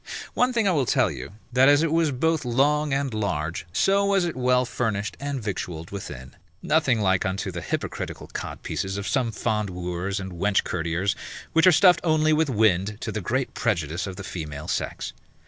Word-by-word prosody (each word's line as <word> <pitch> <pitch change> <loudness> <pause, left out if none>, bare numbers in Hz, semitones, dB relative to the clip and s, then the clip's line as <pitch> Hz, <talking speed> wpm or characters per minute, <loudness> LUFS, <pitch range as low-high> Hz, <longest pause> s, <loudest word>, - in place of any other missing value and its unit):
One 250 +1 +2
thing 230 -4 +1
I - - +4
will 140 -8 +1
tell - - +3
you, - - -8 0.2
that 130 +2 +6
as 145 +2 +5
it 165 - +1
was 165 -1 +3
both 160 +4 0
long 145 +5 +2
and 135 -2 0
large, 85 -7 -2
so 195 - +3
was 200 -2 +2
it 170 - -3
well 125 0 +2
furnished 110 -4 -2
and 140 -1 -3
victualled 90 -6 -5
within, 70 -10 -8 0.3
nothing 150 -6 +2
like 95 -3 +2
unto 95 +1 -2
the 85 -1 -5
hypocritical - - -4
codpieces 95 +1 -4
of 100 - -4
some 125 -4 +1
fond 105 -2 -1
wooers 90 +2 -3
and 95 -1 -6
wench 95 +3 +1
courtiers, 85 +3 -1 0.4
which 160 +3 +5
are - - +9
stuffed 180 +2 +6
only 155 -2 +3
with 155 -1 +2
wind, 105 -3 +2
to - - -3
the 110 - -3
great 130 +8 -1
prejudice 85 -6 -1
of 95 - -6
the 95 - -7
female 75 -5 -6
sex. - - -3
110 Hz, 190 wpm, -25 LUFS, 95-145 Hz, 0.4 s, are